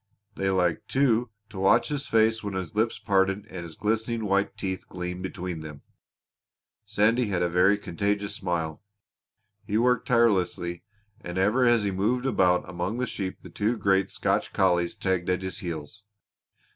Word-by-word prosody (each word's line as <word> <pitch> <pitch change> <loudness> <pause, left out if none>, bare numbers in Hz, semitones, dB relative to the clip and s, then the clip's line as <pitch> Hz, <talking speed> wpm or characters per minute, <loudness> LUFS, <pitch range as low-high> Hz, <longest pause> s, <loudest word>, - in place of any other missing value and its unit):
They 95 0 -1
liked, 90 -3 +1
too, 125 -3 +2 0.2
to 95 - -7
watch 95 +9 +4
his 145 -1 -3
face 110 0 +3
when 100 -2 -4
his 95 -3 -4
lips 110 +2 +1
parted 100 -1 +1
and 90 -5 -8
his 85 -2 -9
glistening 110 +1 -1
white 100 0 0
teeth 95 -1 -4
gleamed 90 0 -5
between 90 -3 -5
them. 75 -2 -9 1.0
Sandy 110 +3 +2
had 90 -3 0
a - - +2
very 90 +4 +4
contagious 100 +2 -2
smile. 85 -6 -3 0.8
He 105 0 -1
worked 125 +1 +2
tirelessly, 95 -7 +2 0.4
and 85 +1 -6
ever 105 +7 +3
as 120 -3 +4
he 100 - 0
moved 110 +7 0
about 90 -8 +2
among 90 +6 -3
the 125 - 0
sheep 95 -6 -4 0.2
two 110 +3 0
great 95 -1 +2
Scotch - - -1
collies 85 -2 +2
tagged 95 -2 -1
at 90 +1 0
his 95 -2 -4
heels. 85 +3 -6
95 Hz, 160 wpm, -26 LUFS, 90-110 Hz, 1.0 s, watch